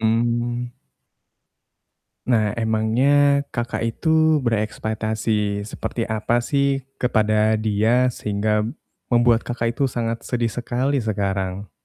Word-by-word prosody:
Mmm. 120 +2 0 1.6
Nah, 110 -4 +2
emangnya 120 +6 +2
Kakak 120 0 -3
itu 160 +6 +2
berekspektasi 110 -2 -1
seperti 115 +1 -4
apa 110 +1 -1
sih 140 -1 0 0.2
kepada 110 -2 +2
dia, 110 +4 +2
sehingga 105 0 -1 0.5
membuat 120 -1 +4
Kakak 115 -1 -2
itu 135 +2 0
sangat 115 -1 -3
sedih 120 -2 -1
sekali 130 +3 -1
sekarang? 100 -3 -2
115 Hz, 95 wpm, -22 LUFS, 110-125 Hz, 1.6 s, membuat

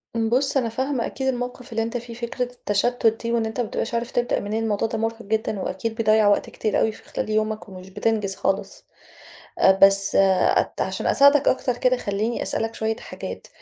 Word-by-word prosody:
ام 225 -1 0
بُص، 270 +3 +2
أنا 235 -3 +1
فاهمة 260 +1 -2
أكيد 265 0 -4
الموقِف 250 0 -4
اللي 225 0 0
أنت 230 +2 -3
فيه، 235 0 -8
فكرة 235 +2 -3
التشَتُّت 240 -1 0
دي 230 - -2
وإن 230 -1 +1
أنت 220 +3 -5
ما 235 - 0
بتبقاش 225 - -3
عارف 235 +1 -2
تبدأ 240 0 0
منين، 215 +2 -3
الموضوع 215 0 0
ده 225 0 -4
مُرهِق 225 +1 -3
جدًا 215 0 -2
وأكيد 225 +3 -3
بيضيَّع 215 -1 +3
وقت 205 - +2
كتير 215 - -1
أوي 220 - +2
في - - -14
خلال - - -5
يومك 215 -1 -1
ومش 185 0 -11
بتنجز 205 -1 -1
خالص. - - -2 0.7
آآ 190 - +6
بس 195 0 +6
أت 190 -1 +3
عشان - - -2
أساعدك 280 0 +5
أكتر 250 -2 +1
كده 255 0 +2
خلّيني 215 +2 -2
أسألك 225 0 -2
شوية 220 0 -1
حاجات، - - -8
225 Hz, 200 wpm, -23 LUFS, 215-245 Hz, 0.7 s, آآ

